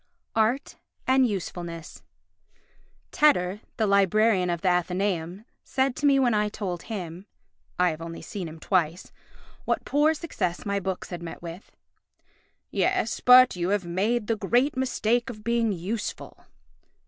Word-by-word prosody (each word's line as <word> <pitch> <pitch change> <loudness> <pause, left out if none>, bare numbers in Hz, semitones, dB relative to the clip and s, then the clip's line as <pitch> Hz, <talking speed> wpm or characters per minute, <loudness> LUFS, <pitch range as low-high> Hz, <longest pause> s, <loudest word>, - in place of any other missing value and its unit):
Art 225 +6 0 0.3
and 260 0 +4
Usefulness 170 -4 -6 1.1
Tedder, 210 -10 +3 0.2
the 220 - +2
Librarian 200 -1 +3
of 170 -1 -2
the 190 - -1
Athenæum, 180 +1 0 0.2
said 265 -1 0
to 290 - +2
me 275 -1 +5
when 250 -3 +3
I 210 0 +1
told 185 -5 -4
him 185 -3 -7 0.5
(I 180 -1 +3
have 155 +1 -8
only 165 0 -7
seen 190 -4 -5
him 160 0 -10
twice) 175 -1 0 0.5
what - - -1
poor 300 +3 +3
success 200 - -3
my 200 -1 0
books 190 -1 -4
had 175 -1 -5
met 170 0 -8
with: 170 +3 -9 1.0
"Yes, 225 - 0
but 250 -1 +7
you 175 0 -1
have 200 -2 0
made 210 +7 0
the 225 - 0
great 240 +8 +1
mistake 245 -1 0
of 215 -3 -9
being 235 -1 +1
useful." 200 +5 -5
200 Hz, 145 wpm, -26 LUFS, 175-235 Hz, 1.1 s, but